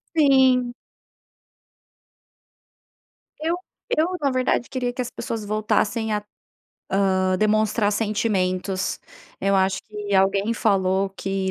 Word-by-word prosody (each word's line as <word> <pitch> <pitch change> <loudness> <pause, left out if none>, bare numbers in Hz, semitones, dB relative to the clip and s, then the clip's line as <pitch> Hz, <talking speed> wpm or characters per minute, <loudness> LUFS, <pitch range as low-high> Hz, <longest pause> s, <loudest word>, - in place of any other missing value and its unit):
Sim. 260 -5 +4 2.7
Eu 325 +3 0 0.4
eu 315 +2 +2
na 280 -2 +1
verdade, 255 -1 0
queria 250 -2 -1
que, 250 - -4
as 245 - -7
pessoas 225 -2 -5
voltassem 215 +1 0
a, 210 0 -1 0.9
hã, 185 0 +1
demonstrar 215 +1 +2
sentimentos. 195 -3 -1 0.4
Eu 195 0 +2
acho 190 0 +1
que 210 -1 -5
alguém 195 +3 +2
falou, 195 -3 +1
que 195 -1 -2
210 Hz, 105 wpm, -23 LUFS, 195-240 Hz, 2.7 s, Sim